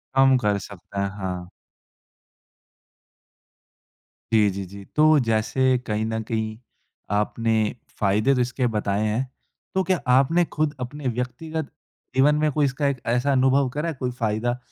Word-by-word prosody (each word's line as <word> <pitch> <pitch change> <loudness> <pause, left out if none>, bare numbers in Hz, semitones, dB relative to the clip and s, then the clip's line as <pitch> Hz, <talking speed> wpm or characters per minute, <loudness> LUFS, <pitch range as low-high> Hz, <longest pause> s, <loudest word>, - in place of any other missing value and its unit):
कम 135 0 +6
कर 105 -4 +1
सकते 100 +1 -8
हैं, 100 0 0
हाँ। 90 -2 -4 2.8
जी, 105 -2 +5
जी, 95 0 -4
जी। 100 +2 -10
तो 155 0 +6
जैसे 125 +3 +2
कहीं 105 +1 0
न 110 0 -2
कहीं 110 -1 -3 0.5
आपने 110 +2 +1 0.4
फ़ायदे 105 +7 +3
तो 125 - +2
इसके 125 +1 0
बताए 105 0 0
हैं, 110 +5 0 0.5
तो 190 - +3
क्या 185 -1 +1
आपने 140 +7 +4
खुद 150 -1 0
अपने 135 +2 -5
व्यक्तिगत 130 +6 -3 0.4
जीवन 145 +3 +5
में 150 0 +1
कोई 150 0 +2
इसका 140 +2 0
एक 135 -3 -2
ऐसा 125 +4 +1
अनुभव 130 0 +3
करा 150 +5 -2
है, - - -3
कोई 125 -1 -3
फ़ायदा 120 +1 -1
125 Hz, 145 wpm, -24 LUFS, 110-140 Hz, 2.8 s, कम